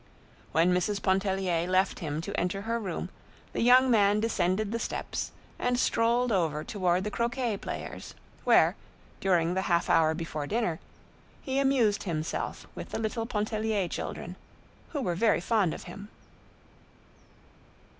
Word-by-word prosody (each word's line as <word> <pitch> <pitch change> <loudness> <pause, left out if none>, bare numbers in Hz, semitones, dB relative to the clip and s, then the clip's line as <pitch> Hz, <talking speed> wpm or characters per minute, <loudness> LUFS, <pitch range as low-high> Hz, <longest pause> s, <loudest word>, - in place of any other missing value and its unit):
When 170 +3 +3
Mrs. 195 +3 0
Pontellier 190 -3 +1
left 185 +1 +2
him 155 -1 -3
to 200 +4 -5
enter 190 +3 -1
her 230 +2 -1
room, 200 -5 -4 0.4
the - - -1
young 255 +2 +6
man 205 -2 +4
descended 205 -1 0
the 230 - -1
steps - - -3 0.3
and 245 0 +1
strolled 240 0 +2
over 160 -6 +1
toward 185 -2 0
the 210 - -3
croquet 235 -1 -1
players, - - -7 0.3
where, - - +5 0.4
during 175 -3 +2
the 190 - 0
half 170 -1 +2
hour 160 -1 +4
before 155 -3 -4
dinner, 210 -6 -1 0.6
he 265 0 0
amused 260 -7 +3
himself 160 -4 -3
with - - -7
the - - -3
little 225 +1 -2
Pontellier 215 -2 -1
children, - - -5 0.5
who 290 - -3
were 180 -8 0
very 220 +6 +3
fond 195 -1 +2
of - - -6
him. 200 +4 -9
200 Hz, 145 wpm, -29 LUFS, 175-230 Hz, 0.6 s, young